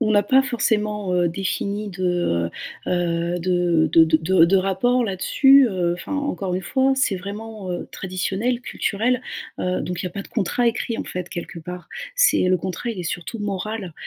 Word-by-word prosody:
on 215 -3 +1
n'a 205 -1 +5
pas 265 +5 +5
forcément, 210 -6 0
heu, 175 -1 +2
défini 200 +3 -2
de, 175 - 0 0.4
heu - - -2
heu, 175 0 0
de 175 -2 +2
de 165 - +8
de 160 0 +3
de 165 +2 +4
de 195 +3 +4
rapport 195 +7 +2
là-dessus. 265 +7 +5
Heu, 180 -4 0
enfin, 180 - -6
encore 195 -11 -2
une 185 - -2
fois, 265 +7 +2
c'est 265 -6 +2
vraiment, 205 +1 -7
heu, 175 - -4
traditionnel, 195 +6 -2
culturel, 245 +5 -1 0.4
heu, 180 0 0
donc 180 -1 -4
il - - -3
y - - -1
a - - -14
pas 200 - -5
de - - -15
contrat 240 +3 0
écrit, 230 0 -1
en - - -3
fait, 180 -1 -5
quelque 175 -2 -6
part. 180 +1 -8 0.3
C'est - - +4
le 185 - +4
contrat, 185 +6 -4
il 220 - -6
est - - -3
surtout 175 +6 -4
moral. 205 -1 -4
190 Hz, 195 wpm, -22 LUFS, 175-225 Hz, 0.4 s, de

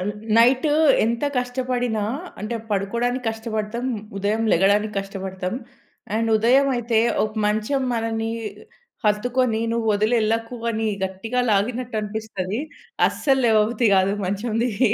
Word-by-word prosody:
అన్ 195 +3 -1 0.3
night 255 +5 +5 0.4
ఎంత 235 +5 0
కష్టపడినా 245 -3 -1 0.4
అంటే 215 +3 -3
పడుకోడానికష్టపడతాం, 225 +1 -2 0.3
ఉదయం 210 +3 0
లెగడానికష్టపడతాం. 195 -1 0 0.6
అండ్ 225 +1 +1
ఉదయం 250 +6 +4
అయితే 235 -1 +1 0.3
ఒక 215 - -3 0.2
మంచం 220 +6 0
మనని 225 -1 -1 0.7
హత్తుకొని 225 +2 +1
నువ్వొదిలెళ్ళకు 225 +1 +1
అని 220 0 -1 0.2
గట్టిగా 195 +6 -2
లాగినట్టనిపిస్తది. 215 -1 -2 0.5
అస్సల్లేవబుద్ది 235 -4 +2
కాదు 190 +1 +3
మంచం 205 +4 -2
దిగి 245 0 +2
225 Hz, 90 wpm, -23 LUFS, 210-240 Hz, 0.7 s, night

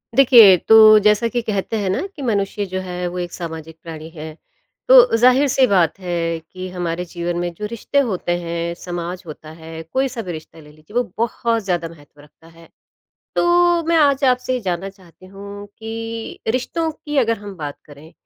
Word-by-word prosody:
देखिए, 235 -8 +8
तो 215 +2 +7
जैसा 210 +2 +4
कि 240 +1 -2
कहते 215 0 -3
हैं 200 -3 -2
ना 185 - -1
कि 290 - -9
मनुष्य 205 -4 -1
जो 185 0 -4
है 180 -1 -4
वो 175 +1 -6
एक 175 -1 -4
सामाजिक 160 -2 -7
प्राणी 160 -1 -9
है। 160 -1 -9 0.5
तो - - +7
ज़ाहिर-सी 260 +2 +4
बात 180 -5 +2
है 170 -2 -2
कि 185 +3 -9
हमारे 175 -1 -4
जीवन 175 0 -4
में 175 0 -2
जो 210 +5 -6
रिश्ते 235 +6 -1
होते 205 -10 -1
हैं, 170 0 -4
समाज 175 +1 -6
होता 155 0 -10
है, 160 0 -10
कोई-सा 255 +7 -2
भी 185 -5 -6
रिश्ता 160 0 -10
ले 150 -1 -15
लीजिए 155 +8 -18
वो 245 - +3
बहुत 230 0 -1
ज़्यादा 175 -3 -1
महत्व 145 -3 -18
रखता 150 +2 -21
है। 165 0 -18 0.7
तो 345 0 +3
मैं 335 0 +2
आज 285 -3 +3
आपसे 255 0 +1
ये 250 - -2
जानना 185 -2 -3
चाहती 185 -2 -18
हूँ 200 +1 -10
कि 225 0 -6
रिश्तों 290 +7 -1
की 295 -1 -7
अगर 230 -3 +1
हम 205 -1 -9
बात 145 -3 -6
करें, 150 +2 -15
190 Hz, 185 wpm, -19 LUFS, 170-230 Hz, 0.7 s, देखिए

